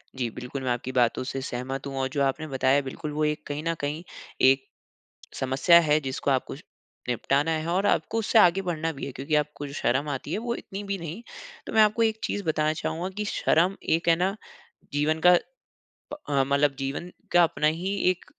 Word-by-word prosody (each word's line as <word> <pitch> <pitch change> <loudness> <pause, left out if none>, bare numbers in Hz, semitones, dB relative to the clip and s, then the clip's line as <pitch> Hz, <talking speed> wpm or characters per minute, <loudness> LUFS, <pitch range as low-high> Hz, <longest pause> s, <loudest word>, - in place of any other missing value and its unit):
जी, 125 -3 -2
बिल्कुल, 125 +4 -7
मैं 125 - 0
आपकी 120 +1 -3
बातों 125 -1 +2
से 135 +1 -4
सहमत 130 +1 -4
हूँ 135 -1 -5
और 130 - +1
जो 140 0 0
आपने 150 +4 -1
बताया, 135 0 +2
बिल्कुल, 140 +2 -6
वो 155 +1 -1
एक 150 0 -1
कहीं 145 +1 -4
न 165 - +2
कहीं 150 +3 -3 0.4
एक 135 +1 +5 0.7
समस्या 135 +6 +5
है, 155 -2 +3
जिसको 135 0 -2
आपको 130 -1 -1
श 140 - -13 0.5
निपटाना 140 +5 +1
है 160 0 -1
और 185 +4 +1
आपको 225 - +1
उससे 225 +1 +1
आगे 185 -1 +5
बढ़ना 165 -3 -2
भी - - -4
है 140 - -5
क्योंकि 140 +4 -2
आपको 150 -1 -1
जो 140 - -9
शर्म 135 +5 0
आती 140 +1 -4
है, - - 0
वो 235 +1 -2
इतनी 200 -2 -7
भी 200 -1 -3
नहीं। 170 +6 -7 0.5
तो - - -5
मैं 220 - +6
आपको 215 +2 +4
एक 220 -1 +1
चीज़ 205 - -2
बताना 155 -2 +1
चाहूँगा 170 +3 -3
कि 210 - -2
शर्म 180 0 +2
एक 165 +2 0
है 165 - +6
ना, 185 +4 0 0.6
जीवन 150 +2 +1
का 180 - +9 0.8
प - - -4
अ, 140 -2 +2
मतलब 140 +1 +2
जीवन 140 +6 -4 0.2
का 175 - +6
अपना 160 -2 +1
ही 175 +6 0 0.2
एक 185 - -4
150 Hz, 210 wpm, -26 LUFS, 135-175 Hz, 0.8 s, का